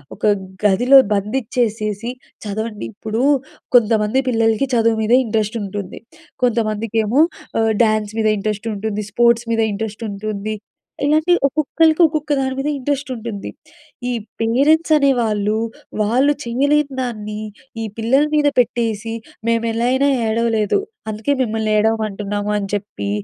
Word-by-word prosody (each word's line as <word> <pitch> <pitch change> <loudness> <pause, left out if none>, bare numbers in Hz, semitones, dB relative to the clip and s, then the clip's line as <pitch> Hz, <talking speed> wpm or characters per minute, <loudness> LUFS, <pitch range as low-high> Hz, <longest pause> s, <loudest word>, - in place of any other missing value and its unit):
ఒక - - -24 0.4
గదిలో 245 +7 +6 0.2
బందిచ్చేసేసి, 215 0 -1 0.3
చదవండి 210 +1 -4
ఇప్పుడు 220 +3 -3 0.5
కొంతమంది 220 +1 +3
పిల్లలకి 225 +2 +2
చదువు 230 -1 +3
మీద 220 +2 +2
ఇంట్రెస్ట్ 220 0 -1
ఉంటుంది. 200 -1 -6 0.4
కొంతమందికేమో 225 +2 +1 0.4
ఆహ్, 225 0 +2
డ్యాన్స్ 215 -1 0
మీద 220 - +2
ఇంట్రెస్ట్ 215 +2 -3
ఉంటుంది, 210 +1 -3
స్పోర్ట్స్ 235 +1 +3
మీద 225 0 +2
ఇంట్రెస్ట్ 220 +2 -5
ఉంటుంది. 215 +1 -4 0.5
ఇలాగే, 310 +4 +3
ఒక్కొక్కళ్ళకి 310 +3 +2
ఒక్కొక్క 305 -1 -1
దాని 265 -1 -1
మీద 275 +2 -2
ఇంట్రెస్ట్ 280 +1 -2
ఉంటుంది. 225 -4 -6 0.6
ఈ - - 0 0.3
పేరెంట్స్ 290 +8 +3
అనేవాళ్ళు, 225 -7 +2 0.5
వాళ్ళు 255 +7 +3
చేయలేని 280 +3 +1
దాన్ని 215 -4 -4 0.4
ఈ - - -2
పిల్లల 255 +6 +3
మీద 295 -1 +3
పెట్టేసి, 225 -2 0 0.4
"మేము 230 0 +1
ఎలా 230 +1 -1
అయినా 270 +2 +2 0.2
ఏడవలేదు, 225 - +1 0.3
అందుకే 220 +7 -1
మిమ్మల్ని 220 -1 -1
ఏడవమంటున్నాము" 210 -1 -1
అని 200 -1 -3
చెప్పి 190 - -5
225 Hz, 120 wpm, -19 LUFS, 210-260 Hz, 0.6 s, గదిలో